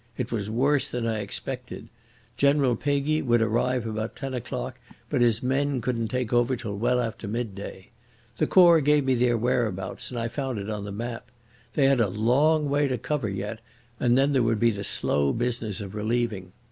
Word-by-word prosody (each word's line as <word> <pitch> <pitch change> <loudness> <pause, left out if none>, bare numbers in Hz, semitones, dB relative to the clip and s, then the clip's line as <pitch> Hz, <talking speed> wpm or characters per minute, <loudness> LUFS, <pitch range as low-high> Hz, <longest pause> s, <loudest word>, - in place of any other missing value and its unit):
It 125 -2 -3
was 105 -3 -2
worse 135 +5 +1
than 120 -1 -3
I 110 -2 -1
expected. 125 +5 -6 0.5
General 140 -2 +3
Peguy 145 +4 0
would 120 -2 +3
arrive 115 +2 +1
about 110 0 -4
ten 135 -1 -5
o'clock, 125 +1 -5 0.3
but 140 -5 +1
his 115 -1 +3
men 135 +1 +1
couldn't 115 -1 -1
take 125 0 -2
over 120 +2 +3
till 115 -4 -5
well 120 +4 +1
after 115 -2 -3
midday. 100 -4 -5 0.5
The - - +1
Corps 170 -3 +7
gave 150 0 +3
me 130 - +3
their 120 -1 +2
whereabouts 110 -5 -1
and 120 - -4
I 115 - -1
found 130 0 -3
it 100 +1 -4
on 105 -1 -4
the 100 - -6
map. 115 +4 -5 0.5
They 140 - +4
had 135 -3 +4
a 110 - +3
long 140 - +2
way 145 +1 +2
to 130 -2 -1
cover 140 -7 -2
yet, 100 +3 -4 0.4
and 120 0 +3
then 140 +2 +3
there 130 - +3
would 115 -2 +1
be 115 +1 +4
the 100 -2 -5
slow 70 -7 0
business 115 -3 -2
of 100 -1 -7
relieving. 110 -3 -2
120 Hz, 195 wpm, -26 LUFS, 110-130 Hz, 0.5 s, Corps